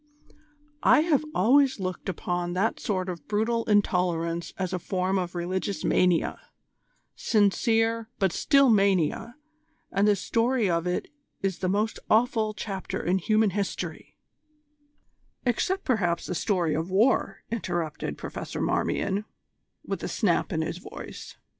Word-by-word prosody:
"I - - +6
have 310 -3 +2
always 265 +6 +4
looked 185 0 -4
upon 175 0 -2
that 195 +5 0
sort 185 -3 -2
of 175 -3 -6
brutal 225 +2 0
intolerance 175 -5 +1
as 185 -2 -2
a 185 - -1
form 185 +2 -1
of 180 -1 -4
religious 185 +3 -2
mania 180 -2 +2 0.8
sincere, 225 +2 +2
but 195 -3 +2
still 275 - +4
mania, 200 +2 +2 0.6
and 200 +2 +2
the 210 - +5
story 230 +3 +1
of 170 -1 0
it 180 - -1 0.4
is 190 -2 -1
the 185 - 0
most 210 +3 0
awful 220 -1 +2
chapter 190 -1 -4
in 185 +2 +1
human 215 +3 +2
history 200 +1 -4 0.6
" 290 -2 -42
"Except, 370 - 0
perhaps, 180 -9 0
the - - -3
story 175 -3 0
of 160 +3 -2
war," 215 +8 +2
interrupted 175 -8 -3
Professor - - -6
Marmion, 200 +2 0 0.6
with - - -3
a - - -3
snap - - +1
in - - 0
his - - -4
voice. - - -9
195 Hz, 135 wpm, -27 LUFS, 180-225 Hz, 0.8 s, I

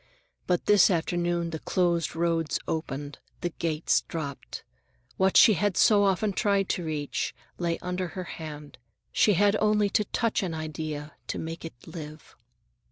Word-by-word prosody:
But 180 -1 +1
this 205 -3 +6
afternoon 175 -1 0
the 160 - -4
closed 170 -2 0
roads 165 -1 0
opened, 145 -2 -4 0.2
the 175 - -1
gates 160 -1 0
dropped. 145 -4 -6 0.5
What 190 0 +3
she 220 - +8
had 205 0 0
so 205 -2 +5
often 195 +2 +1
tried 200 -2 +1
to 180 - -1
reach, 150 -3 -3 0.2
lay 170 -1 0
under 180 0 -2
her 185 - -2
hand. 150 -5 -8 0.3
She 210 - +4
had 205 +3 +4
only 210 -1 +3
to 210 - +2
touch 230 +2 0
an 175 -4 -3
idea 155 -1 -5
to - - -3
make 165 +1 -5
it 150 -7 -10
live. 155 -2 -10
170 Hz, 155 wpm, -27 LUFS, 155-195 Hz, 0.5 s, she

